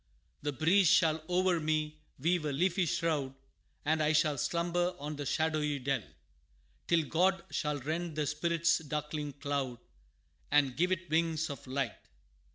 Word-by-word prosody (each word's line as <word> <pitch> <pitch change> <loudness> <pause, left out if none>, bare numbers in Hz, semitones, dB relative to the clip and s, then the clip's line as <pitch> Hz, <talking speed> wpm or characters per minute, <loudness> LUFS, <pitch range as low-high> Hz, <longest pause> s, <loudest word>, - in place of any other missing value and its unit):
The 145 - -1
breeze 170 +8 +3
shall 160 -3 +4
o'er 180 -1 +2
me 155 0 -1 0.2
weave 165 +3 +1
a 150 - 0
leafy 175 +5 +1
shroud, 150 -6 -1 0.5
And 155 +1 +2
I 155 0 +3
shall 150 -1 +3
slumber 175 +3 0
in 150 +1 -4
the 145 -1 -4
shadowy 155 -1 0
dell 135 -1 -1 0.9
Till 170 -2 +3
God 180 +4 +1
shall 150 -1 -1
rend 160 +4 -3
the 155 -1 0
spirit's 170 +3 +1
darkling 150 -1 -4
cloud, 140 -3 -2 0.7
And 140 -3 +3
give 180 +3 +1
it 185 -1 -1
wings 160 -1 +1
of 140 - -9
light. 130 -3 -2
155 Hz, 150 wpm, -32 LUFS, 145-170 Hz, 0.9 s, shall